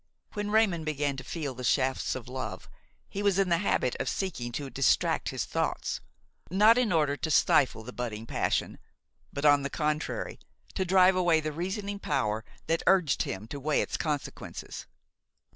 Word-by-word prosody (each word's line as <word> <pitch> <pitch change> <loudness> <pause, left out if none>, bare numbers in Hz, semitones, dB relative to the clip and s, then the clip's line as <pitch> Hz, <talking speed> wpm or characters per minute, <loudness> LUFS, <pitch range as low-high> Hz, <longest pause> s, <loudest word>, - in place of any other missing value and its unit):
When 205 0 -3
Raymon 210 -6 +3
began 145 -2 -1
to 130 - -6
feel 150 -4 -4
the 125 +1 -8
shafts 130 +2 +1
of 125 -3 -7
love 125 -7 -5 0.4
he 200 - -5
was 200 -2 +2
in 195 -2 +2
the 170 -1 +3
habit 130 -9 +1
of - - -1
seeking 160 -11 -3
to 140 +1 -4
distract 135 -2 +2
his - - -2
thoughts, - - -2 0.5
not 210 +6 +6
in 240 -6 +1
order 150 -4 +2
to 160 - -3
stifle 135 -6 +3
the 125 +2 -9
budding 115 -3 -4
passion, - - -1 0.5
but, 140 +1 -3
on 145 -1 +6
the 140 - -3
contrary, 150 +1 -2 0.3
to 190 - -1
drive 185 0 +5
away 175 -3 +3
the 155 0 -3
reasoning 200 +5 -3
power 105 - -1 0.2
that 165 0 0
urged 180 -7 +4
him 95 +3 -4
to 140 - -5
weigh 150 +2 +1
its - - -4
consequences. 150 -3 -4
155 Hz, 175 wpm, -29 LUFS, 130-185 Hz, 0.5 s, not